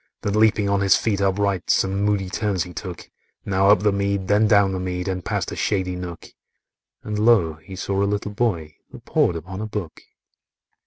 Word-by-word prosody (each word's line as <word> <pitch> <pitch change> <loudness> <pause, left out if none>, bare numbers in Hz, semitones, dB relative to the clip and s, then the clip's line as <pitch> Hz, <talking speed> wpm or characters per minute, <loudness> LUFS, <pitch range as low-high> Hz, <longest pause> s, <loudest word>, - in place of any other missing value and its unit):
Then 100 - -1
leaping 105 -2 +3
on 100 0 +1
his 100 -1 +5
feet 100 -3 0
upright, 100 -1 0
Some 95 +1 +2
moody 100 -2 +1
turns 100 -2 -1
he 90 -1 -10
took,— 90 -3 -8 0.3
Now 95 0 +2
up 105 -2 +5
the 105 0 +3
mead, 100 -1 -1
then 105 +1 +4
down 100 -2 +4
the 95 - -3
mead, 90 0 -3
And 90 -2 -3
past - - -2
a - - -5
shady 95 -3 -1
nook,— 90 -2 -7 0.7
And 105 -1 -3
lo! 105 -9 +3
he 95 +3 -9
saw 100 +1 -2
a - - +3
little 105 0 -2
boy 90 -9 -2
That - - -13
pored 85 - +2
upon 95 +4 -6
a 110 - -3
book. 105 -7 -6
100 Hz, 200 wpm, -22 LUFS, 90-105 Hz, 0.7 s, his